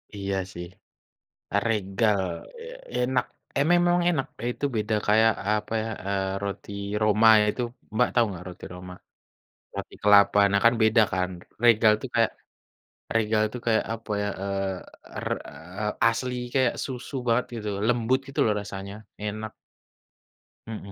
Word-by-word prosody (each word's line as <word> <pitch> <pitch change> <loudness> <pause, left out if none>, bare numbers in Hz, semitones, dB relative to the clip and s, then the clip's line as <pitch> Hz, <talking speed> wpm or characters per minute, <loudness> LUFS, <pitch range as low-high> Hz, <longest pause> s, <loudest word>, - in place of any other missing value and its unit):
Iya, 100 -1 -2 0.2
sih. 85 0 -6 1.0
Regal, 105 -1 +1 0.4
eee, 480 +2 -9 0.2
enak, 125 0 +1 0.3
e 140 - +3
memang 175 0 +4
enak, 145 -6 0 0.2
itu 135 - -3
beda 110 0 0
kayak, 110 +2 +5 0.2
apa 105 +1 -1
ya, 115 - -4 0.2
eee, 95 -1 -1
roti 100 0 -5 0.3
Roma 105 +1 +4
ya - - +3
itu 125 - -5 0.3
Mbak 125 +2 +4
tahu 120 -1 +4
enggak 90 -3 -7
roti 90 - -10
Roma? 90 0 -9 0.8
Roti - - -6
kelapa, 105 0 +6
nah, 100 0 +3
kan 115 +1 +6
beda 110 +1 +5
kan. 90 0 0 0.3
Regal 110 -2 +6
tuh 130 - -6
kayak, 115 -1 +3 0.8
Regal 110 -1 +2
tuh 125 - -6
kayak, 110 -1 +3
apa 115 -1 -8
ya, - - -1 0.2
eee, 95 -1 -5
er - - -5 0.2
eee, 90 +6 -6 0.2
asli 125 +2 +1 0.2
kayak 130 -2 +3
susu 130 +1 -7
banget 120 +1 +3
gitu, 105 -2 -4 0.2
lembut 120 +2 +2
gitu 135 - -9
loh 110 - +3
rasanya, 100 -1 -7 0.3
enak. 110 +1 -4 1.2
Mhm 105 -3 -7
110 Hz, 145 wpm, -26 LUFS, 100-120 Hz, 1.2 s, kelapa